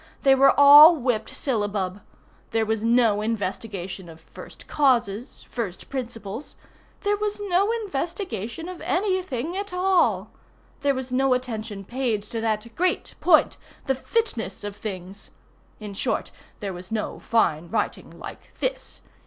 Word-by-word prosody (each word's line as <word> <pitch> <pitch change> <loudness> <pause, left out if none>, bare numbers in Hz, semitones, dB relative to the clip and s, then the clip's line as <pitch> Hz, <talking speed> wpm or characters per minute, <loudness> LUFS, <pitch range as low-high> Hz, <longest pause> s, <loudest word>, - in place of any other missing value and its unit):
They 270 - +6
were 270 +1 +5
all 295 +4 +10
whipped 245 -6 -1
syllabub. 205 -6 -2 0.5
There 225 0 +1
was 220 0 -1
no 230 -3 +3
investigation 195 -4 -4
of 160 0 -12
first - - -13
causes, 245 -5 0
first 215 -7 -5
principles. 235 -2 -6 0.5
There 410 0 +1
was 420 0 -2
no 400 +1 +1
investigation 335 - -4
of 365 -1 -8
any 375 0 +1
thing 315 0 -4
at 400 0 -4
all. 365 0 +2 0.5
There 280 -1 +1
was 260 -1 -5
no 260 0 +3
attention 220 -5 -5
paid 235 -3 -1
to 225 +1 -5
that 220 -1 0
great 365 +1 0
point, 330 -4 +4 0.3
the 270 - +2
"fitness 255 - -2
of 205 -1 -5
things." 195 -2 -7 0.5
In 210 -2 -7
short 195 - -2 0.3
there 200 -2 -3
was 180 +2 -10
no 220 -1 -3
fine 170 -8 +1
writing - - -2
like - - -11
this. - - -3
235 Hz, 140 wpm, -24 LUFS, 205-310 Hz, 0.5 s, all